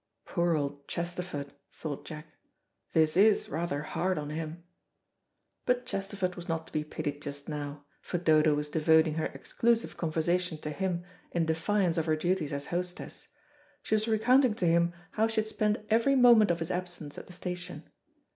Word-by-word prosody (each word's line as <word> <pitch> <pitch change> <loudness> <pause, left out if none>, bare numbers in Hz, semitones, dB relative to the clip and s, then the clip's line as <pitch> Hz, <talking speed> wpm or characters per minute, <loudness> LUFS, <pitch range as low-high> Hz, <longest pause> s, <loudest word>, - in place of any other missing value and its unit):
"Poor 170 -2 +1
old 140 -1 -4
Chesterford," 170 -5 -4 0.2
thought 145 -1 -6
Jack, 150 -2 -8 0.7
"this 155 -1 +3
is 205 +3 +4
rather 150 -1 -2
hard 185 +4 -1
on 150 0 -4
him." 160 +2 -5 1.0
But 250 0 +2
Chesterford 195 -4 -2
was 175 -1 -9
not 165 0 -1
to - - -16
be 155 - 0
pitied 145 -1 -4
just 145 -1 -6
now, 145 -1 -5 0.2
for - - -3
Dodo 155 -3 +4
was 150 0 -2
devoting 160 +1 +4
her 160 0 -1
exclusive 230 0 0
conversation 170 +1 0
to 150 - -4
him 175 +1 -2 0.3
in 170 -1 +2
defiance 165 +2 +1
of 160 - -2
her 155 - +3
duties 175 -1 0
as 140 0 -2
hostess. 180 +1 -4 0.6
She - - -2
was 215 +1 +2
recounting 240 +2 +4
to 190 - -1
him 170 0 +4 0.2
how 220 +1 +2
she 225 -1 +1
had 215 - -6
spent 215 0 0
every 235 +5 +4
moment 240 -5 +7
of 170 - +2
his 165 +1 -3
absence 175 -5 -4
at - - -12
the 180 - -11
station. 180 -2 -6
170 Hz, 175 wpm, -30 LUFS, 155-190 Hz, 1.0 s, moment